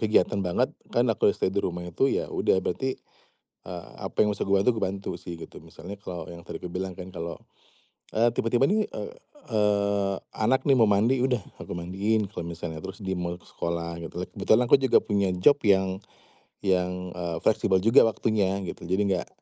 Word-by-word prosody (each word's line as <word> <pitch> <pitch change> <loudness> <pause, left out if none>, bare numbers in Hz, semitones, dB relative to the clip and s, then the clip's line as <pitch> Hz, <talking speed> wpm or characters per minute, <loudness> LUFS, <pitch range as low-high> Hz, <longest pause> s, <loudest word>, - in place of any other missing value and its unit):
kegiatan 105 -2 +2
banget, 90 -2 0 0.2
kan 120 - +2
aku 105 - +3
udah - - +1
stay 95 - 0
di 100 - +1
rumah 90 -2 -3
itu 90 +10 +1
ya, - - 0
udah - - +2
berarti, 130 +9 -1 0.7
eee, 90 -1 -7
apa - - +1
yang 105 - +2
bisa 100 - -3
gue 100 - +4
bantu, 100 +5 +3
gue - - -1
bantu 95 +1 -4
sih 90 -1 -7
gitu, 85 - -10
misalnya 100 0 -10
kalau 90 -4 -6
yang 85 0 -11
tadi - - -7
aku 90 - -5
bilang 95 0 -4
kan 90 +1 -8
kalau, 85 -2 -5 0.8
eee, 115 +2 +4
tiba-tiba 120 +2 +1
nih, 215 0 +2
eee 465 - -6 0.4
eee, 100 -2 +2 0.2
anak 120 +5 +1
nih 140 -2 +4
mau 115 - +6
mandi, 110 +6 +3
udah 125 -4 +1 0.2
aku - - -6
mandiin, 100 +4 -1
kalau 90 -4 -5
misalnya 85 -1 -5
terus 95 +5 -8
dia 95 -1 -2
mau 85 0 -2
ke 90 - -18
sekolah 85 0 -4
gitu 85 -1 -8
kan. - - -6
Kebetulan 115 +3 +3
aku - - +11
juga 130 -2 +4
punya 100 -2 +1
job 145 +11 +5
yang 95 -1 +3 0.6
yang, 90 -1 0
eee, 85 -2 -3
fleksibel 95 - +2
juga 115 +7 +6
waktunya 100 -2 +1
gitu. 90 - -7
Jadi, 95 +3 +1
nggak 90 - -2
95 Hz, 200 wpm, -27 LUFS, 90-110 Hz, 0.8 s, aku